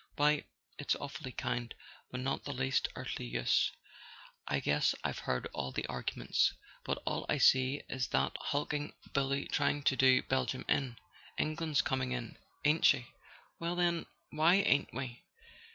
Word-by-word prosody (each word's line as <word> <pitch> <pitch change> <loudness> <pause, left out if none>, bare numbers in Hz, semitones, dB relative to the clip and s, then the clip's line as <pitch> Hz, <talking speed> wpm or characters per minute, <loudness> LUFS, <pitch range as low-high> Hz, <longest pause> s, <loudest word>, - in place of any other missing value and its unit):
Why, 150 0 +3 0.3
it's 145 - +1
awfully 140 -1 -6
kind, 120 -2 -3 0.3
but 125 - -4
not 135 +1 -1
the 140 - -4
least 130 +1 +1
earthly - - -4
use. - - +2 0.8
I - - +1
guess 75 +1 +2
I've - - -2
heard 65 0 -1
all 65 - -3
the - - -2
arguments. - - 0 0.3
But - - -3
all - - -2
I - - +2
see 130 +2 +4
is 130 -2 -2
that 65 0 +1
hulking 145 +1 -2 0.2
bully 140 0 +1
trying 145 -1 +1
to 135 - +3
do 130 0 +5
Belgium 130 0 -1
in. 130 -5 0 0.4
England's 155 -1 +1
coming 130 -1 -1
in, 120 -3 -5 0.3
ain't 150 +2 +3
she? 120 -2 +4 0.5
Well, 170 +1 -1
then 175 -1 +1 0.2
why 160 +4 +5
ain't 145 -8 +3
we?" 125 -1 -5
135 Hz, 150 wpm, -33 LUFS, 125-145 Hz, 0.8 s, do